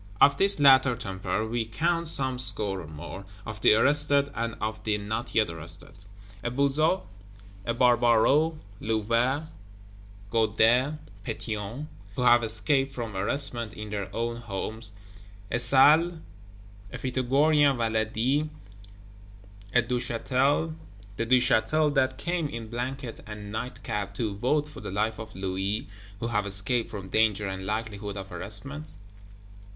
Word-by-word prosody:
Of 140 - +6
this 195 -4 +5
latter 130 -3 +6
temper 95 0 -3
we 115 +1 -1
count 165 +9 -1
some 130 -4 +3
score 105 -6 +4
or 80 - -10
more, 80 +5 -8 0.2
of 110 -1 -7
the 105 - +6
Arrested, 140 +2 +4
and 115 -2 -3
of 110 0 -4
the 105 -1 +1
Not 110 +4 -4
yet 110 -6 +3
arrested: 85 +4 -6 0.4
a - - -2
Buzot, 140 +7 +1 0.6
a 115 - 0
Barbaroux, 125 +6 +4 0.2
Louvet, 115 +6 0 0.9
Guadet, 115 +5 +3 0.3
Pétion, 110 +7 -5 0.3
who 125 - -1
have 120 -1 +6
escaped 135 +5 +1
from 120 -5 -5
Arrestment 120 +2 -3
in 105 -1 -7
their 100 -2 -3
own 115 +1 -2
homes; 110 0 -4 0.6
a 120 - +1
Salles, 150 +7 +5 0.8
a 125 - -6
Pythagorean 135 +3 +2
Valady, 115 +6 0 1.2
a 120 +2 +4
Duchâtel, 125 - 0 0.4
the 115 +2 -2
Duchâtel 130 +5 +3
that 130 -1 +1
came 170 +2 -1
in 115 -3 -7
blanket 125 0 -5
and 105 -1 -8
night 120 +3 -5
cap 100 -1 -4
to 110 -3 -2
vote 145 +8 0
for 150 - -11
the - - -6
life 110 +3 -1
of 110 -1 -9
Louis, 95 +2 -2 0.3
who - - -3
have 105 -3 0
escaped 100 +5 0
from 95 -3 -7
danger 105 -1 +2
and 95 0 -5
likelihood 105 -1 -4
of 95 0 -7
Arrestment. 140 +10 -7
115 Hz, 135 wpm, -27 LUFS, 105-135 Hz, 1.2 s, Of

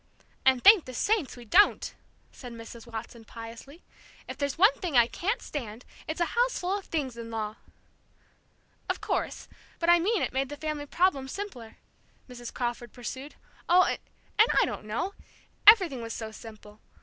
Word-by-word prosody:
"And 260 -2 +4
thank 405 -4 +8
the 255 - -8
saints 400 - 0
we 240 - -11
don't!" 390 - +4 0.4
said 245 -3 -10
Mrs. 230 0 -10
Watson, 225 +1 -7
piously. 230 +8 -11 0.4
"If - - -6
there's 280 0 -2
one 400 +8 +6
thing 340 -9 0
I 240 - +7
can't 395 - -2
stand, 235 -5 -6 0.2
it's 315 +2 -4
a 345 - +3
houseful 470 -6 +1
of 405 - -5
things 270 -7 -3
in 230 -1 -7
law!" 215 -1 -4 1.3
"Of - - -1
course; - - -3 0.3
but 340 0 +3
I 345 - +6
mean 405 +4 +1
it - - -2
made 265 0 -1
the 290 - -7
family 305 -1 -4
problem 310 -5 +1
simpler," 260 - -7 0.5
Mrs. 245 -2 -8
Crawford 240 -1 -4
pursued. 260 +4 -7 0.3
"Oh 360 +1 +7
and 435 +4 0
I - - +4
don't - - -6
know! 290 - -3 0.5
Everything 370 - +7
was 230 0 -5
so 220 -1 -6
simple. 215 -1 -12
265 Hz, 165 wpm, -28 LUFS, 230-355 Hz, 1.3 s, thank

